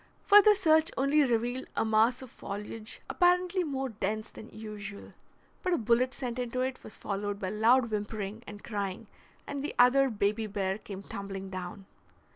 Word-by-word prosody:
Further 415 0 +7
search 315 -3 +4
only 275 +3 +3
revealed 245 -1 0
a - - +1
mass 225 +4 +3
of 255 - -11
foliage 210 +2 -6
apparently 360 +1 +2
more 270 -4 -2
dense 215 0 -3
than 220 - -11
usual, 210 -2 -8 0.5
but 365 -2 0
a - - +3
bullet 235 +3 +2
sent 250 -3 -4
into 250 +1 -2
it 260 0 -3
was - - -6
followed 205 0 -3
by 190 -2 -3
loud 230 +3 +3
whimpering 210 0 -4
and 205 0 -9
crying, 200 -1 -4 0.4
and 280 -1 -4
the 295 - -4
other 265 +2 +5
baby 215 0 0
bear 195 -1 -2
came 195 -2 -8
tumbling 195 -1 -6
down. 185 +2 -6
225 Hz, 165 wpm, -30 LUFS, 205-265 Hz, 0.5 s, Further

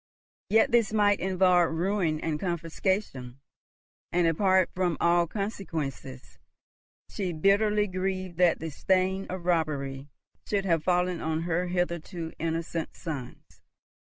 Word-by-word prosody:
Yet 225 +5 +4
this 230 -3 +3
might 205 -2 +3
involve 180 -2 +3
ruin 175 -3 0
and 155 -2 -2
confiscation; 165 -6 -2 0.7
and, 175 0 +2
apart 185 +2 +3
from 180 -4 0
all 170 0 +3
consequences, 160 - -5 0.7
she 185 -4 -3
bitterly 205 +5 +3
grieved 185 -2 -3
that 180 -2 +4
the 160 -1 -5
stain 190 +4 0
of 180 -1 -6
robbery 145 -5 -1 0.4
should 200 -2 0
have 165 -4 +1
fallen 180 -1 +1
on 160 0 -1
her 175 +1 -1
hitherto 170 -1 -3
innocent 165 0 -3
sons. 145 -8 -8
175 Hz, 120 wpm, -28 LUFS, 160-190 Hz, 0.7 s, Yet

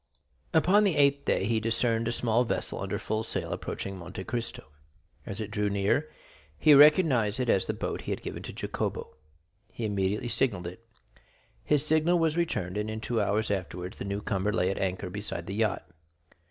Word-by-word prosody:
Upon 190 +6 +4
the 195 -6 +2
eighth 140 -1 +3
day - - +1
he 110 +1 +1
discerned 115 +1 0
a - - +1
small 120 0 +1
vessel 120 - -2
under - - -2
full 110 0 -2
sail - - -4
approaching 95 -1 -5
Monte 90 +2 -7
Cristo. 115 +2 -4 0.6
As 100 - -5
it 110 -1 -5
drew 105 0 0
near, 100 0 +1 0.5
he 150 - +6
recognized 140 - +5
it 125 -2 0
as 95 - +3
the - - -1
boat - - -3
he - - -5
had - - -3
given - - -5
to - - -7
Jacopo. - - -4 0.6
He 115 - -4
immediately 100 +2 -1
signalled 105 -5 +2
it. 90 +6 -8 0.8
His 150 -1 +2
signal 160 +3 +3
was 165 -2 +1
returned, 105 - -1
and 105 +1 -2
in 110 0 -4
two 115 0 -1
hours 105 +1 0
afterwards 90 -1 -4
the - - -4
new 100 +1 -3
comer 100 +1 0
lay 95 -3 +1
at - - -4
anchor 95 -1 -2
beside 100 -3 -4
the 95 - -5
yacht. 110 -1 -1
110 Hz, 190 wpm, -28 LUFS, 100-130 Hz, 0.8 s, he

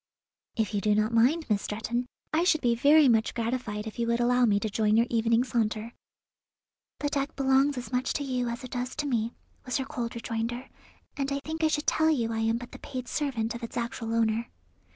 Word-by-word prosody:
"If 220 -2 -1
you 205 - 0
do 210 +1 +2
not 215 +2 +1
mind, 270 +9 +3
Miss 210 -3 +1
Stretton, 235 +4 -3 0.3
I 320 +2 +3
should 315 -4 +3
be 240 -2 +3
very 290 +5 +6
much 225 -2 +2
gratified 230 -3 -2
if 220 +2 -7
you 235 - 0
would 235 0 +1
allow 245 +1 +4
me 205 -3 +3
to 220 - -1
join 215 +1 +2
your 230 - +4
evening 230 +1 +3
saunter." 225 -2 -1 1.1
"The 290 - 0
deck 280 +1 -2
belongs 270 +1 +3
as 250 - -6
much 250 0 0
to 290 - -2
you 250 -3 -1
as 235 +3 -5
it 255 - -8
does 245 0 -3
to 300 - -2
me," 235 -4 -1 0.3
was 255 - -1
her 265 - -2
cold 240 -5 -4
rejoinder, 235 +2 -3 0.5
"and 275 -1 -2
I 280 - 0
think 320 +1 -3
I - - +6
should 305 -1 -1
tell 315 0 +3
you 235 -7 +1
I 225 - -2
am 225 +1 +1
but 245 +1 -9
the - - -10
paid 255 -3 -6
servant 240 -7 -1
of 235 - -7
its 230 - -6
actual 230 -1 -3
owner." 225 0 +1
240 Hz, 225 wpm, -28 LUFS, 225-270 Hz, 1.1 s, very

